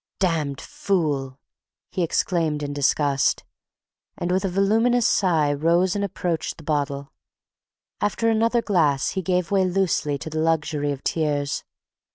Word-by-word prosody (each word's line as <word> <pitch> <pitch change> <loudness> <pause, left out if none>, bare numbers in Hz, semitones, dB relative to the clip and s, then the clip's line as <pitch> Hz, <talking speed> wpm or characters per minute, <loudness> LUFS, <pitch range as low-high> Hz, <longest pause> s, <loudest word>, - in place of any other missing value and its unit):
"Damned 155 -7 0
fool!" 145 -9 -2 0.5
he 185 - -2
exclaimed 165 -3 0
in 145 0 -3
disgust, 145 -1 +1 0.7
and 175 - -2
with 185 +2 +1
a 195 - 0
voluminous 225 +6 +2
sigh 160 -6 +2
rose 170 +5 +2
and 200 - -1
approached 175 -4 -2
the 160 - -12
bottle. 140 -1 -2 0.9
After 210 +2 0
another 230 +1 +2
glass 150 -9 +2
he 190 - -2
gave 180 +1 -1
way 195 -1 +3
loosely 180 -6 0
to 160 - -7
the 155 - -2
luxury 150 -2 0
of 140 -1 -6
tears. 145 -3 -1
165 Hz, 140 wpm, -23 LUFS, 145-190 Hz, 0.9 s, way